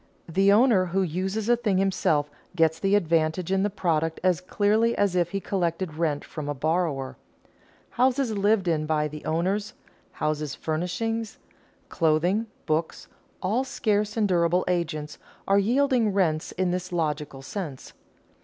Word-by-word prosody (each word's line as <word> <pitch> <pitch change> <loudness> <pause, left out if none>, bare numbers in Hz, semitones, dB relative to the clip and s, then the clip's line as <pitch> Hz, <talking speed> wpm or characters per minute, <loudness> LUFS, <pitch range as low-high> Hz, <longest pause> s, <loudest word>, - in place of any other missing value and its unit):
The 195 +4 +3
owner 215 -3 +5
who 190 +2 0
uses 190 +5 -2
a 240 - +5
thing 220 -5 0
himself 175 -6 +1 0.3
gets 160 -2 +2
the 195 +1 +2
advantage 165 -1 +1
in 195 0 +2
the 205 - +1
product 165 -5 -1
as 185 -2 +2
clearly 215 +5 +1
as 200 -3 +1
if 175 -1 +2
he 195 - -2
collected 175 -3 -2
rent 155 -2 -1
from 150 -2 -6
a 145 - -2
borrower. 155 -2 -1 0.7
Houses 255 -2 +1
lived 200 -1 +2
in 155 -2 0
by 150 -1 +1
the 150 0 -9
owners, 195 +6 -1 0.4
house 150 -2 -2
furnishings, 210 +8 -3 0.5
clothing, 175 +7 +1 0.2
books, 160 +1 -2 0.3
all 215 +8 +1
scarce 210 -5 -1
and 215 -2 +3
durable 175 -1 +2
agents, 160 -4 -2 0.3
are 195 +1 +4
yielding 240 0 +2
rents 160 -5 0
in 185 -1 0
this 180 0 -3
logical 150 -5 -2
sense. 150 -5 -6
180 Hz, 145 wpm, -26 LUFS, 160-205 Hz, 0.7 s, owner